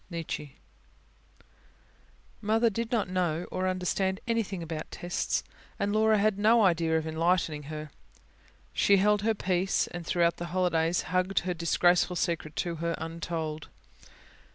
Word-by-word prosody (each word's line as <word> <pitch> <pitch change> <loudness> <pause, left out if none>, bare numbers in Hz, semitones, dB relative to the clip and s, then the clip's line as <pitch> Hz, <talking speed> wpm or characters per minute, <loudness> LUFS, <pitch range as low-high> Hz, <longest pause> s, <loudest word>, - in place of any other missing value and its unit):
NIETZSCHE 165 -4 -5 1.9
Mother 225 +2 +2
did 230 +2 -3
not 225 -6 +1
know 180 -2 -1
or 185 0 -1
understand 185 +1 0
anything 215 -6 -1
about 160 -1 -5
"tests"; 175 0 -2 0.3
and 200 0 -1
Laura 220 0 +4
had 205 -1 +1
no 225 +2 +5
idea 165 -3 +2
of 160 - -2
enlightening 160 -2 0
her. 155 -1 -6 0.8
She 200 - +4
held 210 +1 +3
her 220 +1 +1
peace, 185 -1 +1
and 175 -1 -7
throughout 170 0 +1
the 175 - -4
holidays 170 -1 +1
hugged 185 +1 +2
her 180 0 -2
disgraceful 175 +1 +2
secret 165 -3 -2
to 170 -2 -2
her, 170 +1 -1
untold. 165 -2 -4
180 Hz, 135 wpm, -29 LUFS, 165-200 Hz, 1.9 s, no